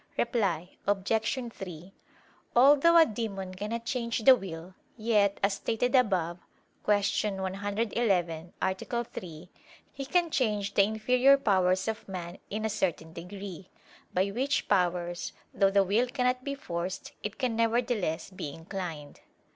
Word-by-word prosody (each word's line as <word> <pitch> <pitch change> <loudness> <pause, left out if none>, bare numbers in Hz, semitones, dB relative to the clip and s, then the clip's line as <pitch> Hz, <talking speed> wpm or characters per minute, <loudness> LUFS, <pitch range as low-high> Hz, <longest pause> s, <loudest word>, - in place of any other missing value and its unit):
Reply 190 -8 0
Obj. 200 -1 0 0.4
3: 180 0 -9 0.6
Although 290 +7 +6
a 330 - +8
demon 200 -6 -4
cannot 220 +5 -4
change 235 -2 -1
the 265 +2 +9
will, 180 -4 -8 0.2
yet, 210 -3 +2
as 200 0 +3
stated 230 +4 -1
above 185 -9 +2 0.5
(Q. 205 0 +2
111, 190 -3 -1
A. 190 - +1 0.3
3), 175 -6 -9 0.4
he 275 - -5
can 345 +2 +2
change 210 -7 0
the 200 - +5
inferior 250 +6 +4
powers 185 -6 +2
of 220 -2 -4
man, 180 -1 -6
in 215 +2 -3
a - - +3
certain 170 -6 -2
degree: 185 +1 -8 0.4
by 190 +2 +1
which 270 +7 0
powers, 175 -2 0 0.2
though 195 - +4
the 200 0 +4
will 210 +6 +2
cannot 250 0 0
be 280 0 -3
forced, 175 -7 -5
it 210 0 -5
can 250 -4 -1
nevertheless 225 -7 0
be 180 -5 -5
inclined. 165 -3 -7
200 Hz, 135 wpm, -29 LUFS, 180-235 Hz, 0.6 s, the